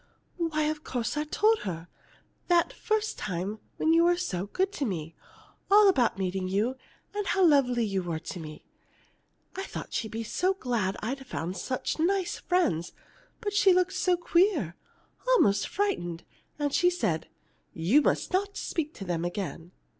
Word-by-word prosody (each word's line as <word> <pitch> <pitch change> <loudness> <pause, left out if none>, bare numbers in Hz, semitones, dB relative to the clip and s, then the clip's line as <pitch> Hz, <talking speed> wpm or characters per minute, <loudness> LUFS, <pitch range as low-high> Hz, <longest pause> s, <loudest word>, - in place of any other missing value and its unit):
"Why, 325 -3 0
of 305 0 -1
course 245 0 -2
I 300 0 -1
told 430 +8 +3
her 170 -3 -5 0.6
that 345 -1 +3
first 435 0 -1
time 195 +3 -3 0.2
after - - -5
you 330 +1 +5
were 350 0 +4
so 195 - -2
good 380 - 0
to 405 - -3
me 165 -7 -4 0.6
all 410 +1 +7
about 255 - +3
meeting 190 0 -2
you, 210 +7 0 0.4
and 415 -1 -2
how 380 -1 +3
lovely 250 -7 +4
you 195 -2 -1
were 170 -3 -3
to 175 +3 -7
me. 155 -2 -9 0.9
I 385 - -3
thought 390 - -7
she'd 220 - -2
be 225 +1 -4
so 370 - 0
glad 235 - -1
I'd 265 +4 -4
found 180 -5 -4
such 255 - -3
nice 370 +2 +1
friends. 180 - 0 0.5
But 410 -3 -2
she 400 -2 +5
looked 365 +1 +2
so 365 -1 +2
queer 340 - +2 0.5
almost 325 - +4
frightened, 175 - -2 0.3
and 290 -2 -1
she 355 - +4
said: 165 - -1 0.4
'You 185 - +3
must 300 - 0
not 400 +2 0
speak 315 -2 -3
to 195 - -7
them 170 -2 -1
again. 175 -2 -4
275 Hz, 165 wpm, -28 LUFS, -, 0.9 s, all